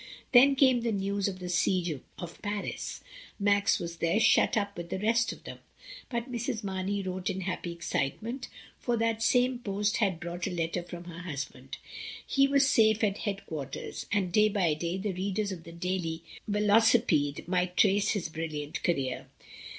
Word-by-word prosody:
Then 270 +2 +7
came 260 -3 +4
the 230 -1 0
news 200 0 0
of 190 -2 -3
the 180 -1 -6
siege 175 -4 +1 0.2
of 175 -1 -8
Paris. 205 -1 -4 0.4
Max 200 0 +3
was 170 0 -5
there 170 +6 +2
shut 225 - +4
up 200 -1 -1
with 170 0 -6
the 190 - -2
rest 230 +4 +2
of - - -11
them, - - -8 0.5
but 235 +1 -3
Mrs. 235 -1 -3
Marney 195 +1 -2
wrote 185 0 -3
in 190 0 -3
happy 180 -1 -3
excitement, 215 - -3 0.3
for 240 -1 0
that 225 0 0
same 250 +1 +3
post 205 -2 0
had 195 -7 +1
brought 175 0 -4
a - - -1
letter 170 0 -1
from 175 0 -9
her 170 -1 -9
husband. 140 -6 -6 0.5
He 275 0 +3
was 275 -1 +4
safe 220 -3 +4
at 200 -1 +1
head 200 -2 -3
quarters, 140 -4 -6
and 195 -3 +1
day 215 +3 +5
by 185 -6 +2
day 170 +4 -2
the 195 0 -2
readers 200 +3 -1
of 170 -3 -7
the 165 - -9
Daily 170 -1 -3 0.2
Velocipede 210 - +3
might 180 0 0
trace 205 0 +4
his 200 -6 -2
brilliant 155 -2 -4
career. 135 -7 -1
195 Hz, 175 wpm, -29 LUFS, 170-215 Hz, 0.5 s, Then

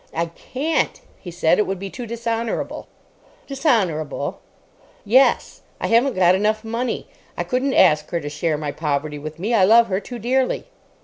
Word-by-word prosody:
"I 165 +1 +1
can't," 305 - -2 0.2
he 180 - -9
said. 175 +1 +2
"It 210 - +2
would 195 - -2
be 195 +1 -7
too 245 -2 -7
dishonourable." 230 0 -3 0.6
"Dishonourable?" 220 - -1 0.7
"Yes. 255 +6 +3 0.2
I - - -2
haven't 240 +4 +3
got 180 -1 +5
enough 215 +3 +1
money. 230 +3 -3 0.3
I - - -1
couldn't 260 +1 -1
ask 155 -5 +4
her 170 - -1
to 145 - -7
share 150 +2 -1
my 150 -1 -3
poverty 150 0 -2
with 155 +1 -7
me. 205 +8 -2
I 210 -5 +4
love 225 +3 +6
her 190 0 0
too 245 +3 -8
dearly." 255 +3 0
210 Hz, 170 wpm, -21 LUFS, 165-240 Hz, 0.7 s, love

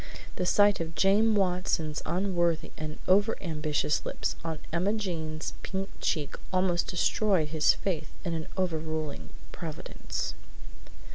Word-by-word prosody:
The 180 - 0
sight 205 +2 +5
of 165 -1 -4
James 210 +3 +4
Watson's 180 -5 +1
unworthy 175 -3 +1
and 155 0 -5
over 200 +4 +4
ambitious 155 -4 0
lips - - -2
on 165 -1 -2 0.2
Emma 185 +5 +2
Jane's 160 -7 -3
pink 195 0 -3
cheek 150 -3 0 0.2
almost 185 -2 +2
destroyed 180 -2 +2
his 155 -1 +4
faith 160 -6 -2 0.2
in 170 - 0
an 160 -1 -3
overruling 155 - -2 0.2
Providence. 160 -3 -4
170 Hz, 125 wpm, -29 LUFS, 155-190 Hz, 0.2 s, sight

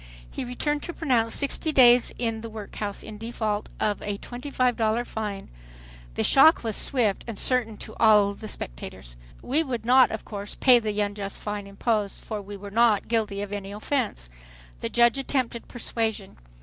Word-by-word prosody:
He - - -4
returned 295 +4 -2
to 345 - -5
pronounce, 240 -9 +1
"Sixty 290 +2 +1
days 245 -3 +6
in 225 -2 -2
the 230 - -7
workhouse 210 -1 -5
in 215 -1 -9
default 220 -2 -3
of 210 -1 0
a 205 -1 -3
twenty 245 +7 -8
five 255 -3 +1
dollar 225 +1 0
fine." 210 -4 -5 0.7
The - - 0
shock 315 +3 +6
was 220 -3 -1
swift 225 -7 +1
and 230 -3 -5
certain 230 -3 0
to - - -8
all 210 -3 +5
the 215 +2 -9
spectators. - - -8 0.3
We 285 +6 +2
would 245 -7 -4
not 255 +2 +6
of 220 - -6
course 205 -1 -6
pay 250 -2 +6
the 210 -2 -3
unjust 205 -1 -4
fine 205 -1 -4
imposed, 205 0 -1
for 215 -1 -5
we 200 0 -9
were 200 +1 -9
not 225 -2 +3
guilty 215 -3 0
of 205 0 -7
any 200 -1 -5
offense. 215 - -2 0.5
The - - -3
judge 235 +2 +3
attempted 255 -4 -2
persuasion. 225 -4 -3
220 Hz, 175 wpm, -25 LUFS, 205-245 Hz, 0.7 s, days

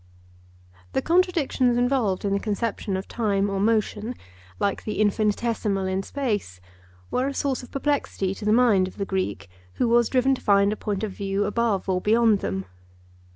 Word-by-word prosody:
The - - +1
contradictions 330 -8 +2
involved 245 -7 +1
in 200 - +1
the 200 - +1
conception 210 -2 -2
of 190 - -6
time 200 -3 0
or 195 - -1
motion, 220 +2 0 0.4
like 200 -1 -1
the 215 - -4
infinitesimal 210 -1 +1
in 190 0 -1
space, 205 - -3 0.5
were 255 +2 +1
a 280 - -4
source 275 -2 -1
of 250 - -12
perplexity 275 -9 -1
to 205 - -8
the 210 - +3
mind 215 -5 +4
of 185 - -11
the 200 - -2
Greek, 185 - -3 0.3
who 245 - 0
was 235 0 +3
driven 265 +1 +3
to 265 - -4
find 200 0 +3
a - - -4
point 205 -1 -3
of 215 - -2
view 195 +1 -2
above 210 -2 0
or 185 -1 0
beyond 225 0 +3
them. 95 - -3
210 Hz, 175 wpm, -24 LUFS, 195-245 Hz, 0.5 s, mind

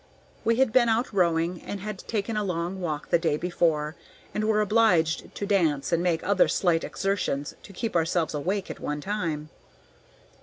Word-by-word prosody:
We 230 - +3
had 255 -2 +2
been 240 -2 +5
out 225 +1 +1
rowing 170 -2 +1
and 200 - -5
had 205 0 -5
taken 220 0 -3
a 210 - 0
long 180 0 -3
walk 155 -4 -3
the 170 - +5
day 160 -3 +1
before, 160 -3 0 0.4
and 215 - -1
were 215 -1 +2
obliged 210 -7 +2
to 205 - -3
dance 165 -9 +1
and 170 0 +2
make 175 -2 0
other 200 -1 +4
slight 170 -3 +2
exertions 185 -8 -2
to - - -13
keep 220 +2 -4
ourselves 165 0 +1
awake 185 +7 -2
at - - -9
one 150 0 -3
time. 160 -5 -3
180 Hz, 180 wpm, -26 LUFS, 165-210 Hz, 0.4 s, been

